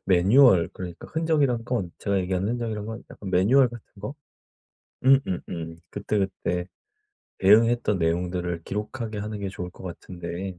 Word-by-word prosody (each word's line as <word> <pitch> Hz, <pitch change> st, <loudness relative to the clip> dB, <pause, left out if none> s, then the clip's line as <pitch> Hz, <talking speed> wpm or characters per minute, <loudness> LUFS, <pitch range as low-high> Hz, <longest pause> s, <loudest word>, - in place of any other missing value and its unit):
매뉴얼 95 Hz, +1 st, +6 dB
그러니까 90 Hz, -2 st, -8 dB
흔적이란 150 Hz, -8 st, +1 dB
건, 115 Hz, -9 st, -2 dB
제가 100 Hz, -1 st, 0 dB
얘기한 95 Hz, +1 st, -1 dB
흔적이란 110 Hz, -3 st, -2 dB
건 110 Hz, 0 st, -6 dB
약간 95 Hz, -2 st, -8 dB
매뉴얼 120 Hz, +9 st, +5 dB
같은 120 Hz, -2 st, -10 dB, 0.2 s
거? 105 Hz, +8 st, -5 dB, 0.9 s
음음음. 90 Hz, -11 st, +1 dB
그때그때 95 Hz, -3 st, -2 dB, 0.7 s
대응했던 110 Hz, +1 st, +4 dB
내용들을 85 Hz, 0 st, -1 dB
기록하게 110 Hz, +2 st, -4 dB
하는 105 Hz, 0 st, -4 dB
게 100 Hz, -1 st, -3 dB
좋을 90 Hz, -2 st, -6 dB
것 -, -, -14 dB
같은데 90 Hz, 0 st, -6 dB
100 Hz, 330 characters per minute, -25 LUFS, 90-115 Hz, 0.9 s, 매뉴얼